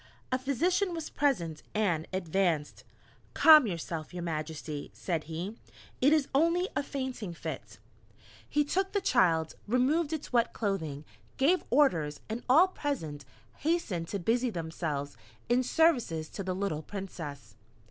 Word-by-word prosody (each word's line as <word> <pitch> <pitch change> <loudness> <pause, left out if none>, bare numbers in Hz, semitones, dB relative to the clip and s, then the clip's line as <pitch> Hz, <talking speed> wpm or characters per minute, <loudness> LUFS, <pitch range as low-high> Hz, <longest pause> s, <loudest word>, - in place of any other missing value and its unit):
A 255 - +1
physician 345 - +1
was 325 -2 -5
present 175 - 0
and 175 -7 +1
advanced. 175 -4 0 0.5
"Calm 310 -6 +8
yourself, 165 -2 -5
your 175 - -4
Majesty," 155 -2 -4
said 165 -4 -2
he, 170 +8 -5 0.4
"It 275 +3 +5
is 310 -3 +3
only 335 +6 +3
a - - +2
fainting 260 -10 -4
fit." - - -7 0.7
He 295 0 +2
took 385 +6 -1
the 405 - +2
child, 160 - +3
removed 280 +8 +2
its 310 -4 -5
wet 235 -1 +3
clothing, 160 -9 -2 0.3
gave 335 +7 +3
orders, 165 - +3
and 225 +2 -3
all 320 +9 +7
present 160 - -4 0.3
hastened 290 - -1
to 200 - -3
busy 235 +7 +1
themselves 160 -6 -4 0.3
in 245 +1 +4
services 250 - +2
to - - -6
the 185 -1 -2
little 190 -6 -2
Princess. 150 - -7
200 Hz, 135 wpm, -30 LUFS, -, 0.7 s, Calm